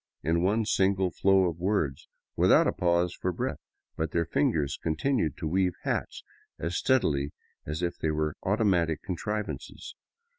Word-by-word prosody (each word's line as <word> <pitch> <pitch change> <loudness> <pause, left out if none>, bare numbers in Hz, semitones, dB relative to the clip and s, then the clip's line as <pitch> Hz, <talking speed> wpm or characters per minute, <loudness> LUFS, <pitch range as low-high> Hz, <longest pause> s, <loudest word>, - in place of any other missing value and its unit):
in 80 +3 +1
one 105 +5 +2
single 95 -2 +2
flow 95 +3 +3
of 85 -1 -4
words, 90 -8 -1 0.3
without - - +5
a - - +2
pause 85 0 +1
for 90 - -2
breath, - - -3 0.4
but 80 0 -2
their 85 +2 0
fingers 75 -3 0
continued 80 - 0
to 80 - -3
weave 90 +2 +1
hats - - -2 0.3
as 85 +3 -3
steadily 75 - +1 0.3
as 80 +3 -3
if 85 - -2
they 80 - 0
were 75 0 0
automatic 95 -6 +1
contrivances. 105 +3 -4
85 Hz, 150 wpm, -28 LUFS, 80-95 Hz, 0.4 s, without